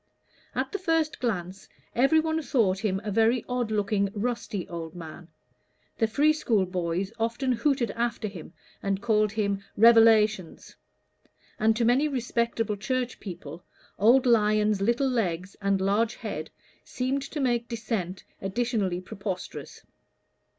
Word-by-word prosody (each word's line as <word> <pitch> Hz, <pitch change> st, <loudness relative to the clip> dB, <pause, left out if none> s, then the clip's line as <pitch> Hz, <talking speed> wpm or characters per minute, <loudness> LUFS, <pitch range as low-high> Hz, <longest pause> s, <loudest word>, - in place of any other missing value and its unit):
At -, -, -1 dB
the 400 Hz, -, -3 dB
first 325 Hz, -4 st, 0 dB
glance, 195 Hz, -5 st, -3 dB, 0.2 s
every 275 Hz, +6 st, +4 dB
one 320 Hz, 0 st, 0 dB
thought 215 Hz, -10 st, +1 dB
him 195 Hz, -3 st, -1 dB
a 210 Hz, -, -3 dB
very 225 Hz, +3 st, +2 dB
odd 250 Hz, -2 st, -1 dB
looking 205 Hz, -1 st, +1 dB
rusty 215 Hz, -4 st, -3 dB
old 165 Hz, -1 st, -7 dB
man; 165 Hz, 0 st, -9 dB, 0.7 s
the 225 Hz, -, +3 dB
free 295 Hz, +7 st, +3 dB
school 225 Hz, -10 st, +1 dB
boys 180 Hz, +2 st, -2 dB
often 235 Hz, +4 st, 0 dB
hooted 260 Hz, -1 st, +1 dB
after 235 Hz, -1 st, -2 dB
him, 180 Hz, -6 st, -9 dB, 0.3 s
and 195 Hz, -1 st, -1 dB
called 215 Hz, -1 st, +1 dB
him 200 Hz, -2 st, -1 dB
"Revelations"; 220 Hz, -4 st, +4 dB, 0.8 s
and 220 Hz, +1 st, +3 dB
to 230 Hz, +1 st, +1 dB
many 255 Hz, +6 st, +3 dB
respectable 235 Hz, -5 st, -1 dB
Church 255 Hz, +3 st, -2 dB
people, 170 Hz, -4 st, -8 dB, 0.4 s
old 240 Hz, +6 st, +5 dB
Lyon's 215 Hz, -3 st, +3 dB
little 235 Hz, +6 st, +2 dB
legs 190 Hz, -7 st, -1 dB
and 195 Hz, -1 st, +1 dB
large 205 Hz, +4 st, +1 dB
head -, -, -5 dB, 0.3 s
seemed 260 Hz, +2 st, -2 dB
to 285 Hz, +3 st, -6 dB
make 240 Hz, -3 st, 0 dB
Dissent 215 Hz, -6 st, -4 dB, 0.2 s
additionally 195 Hz, -3 st, -1 dB
preposterous. 195 Hz, -1 st, -7 dB
220 Hz, 135 wpm, -27 LUFS, 195-245 Hz, 0.8 s, old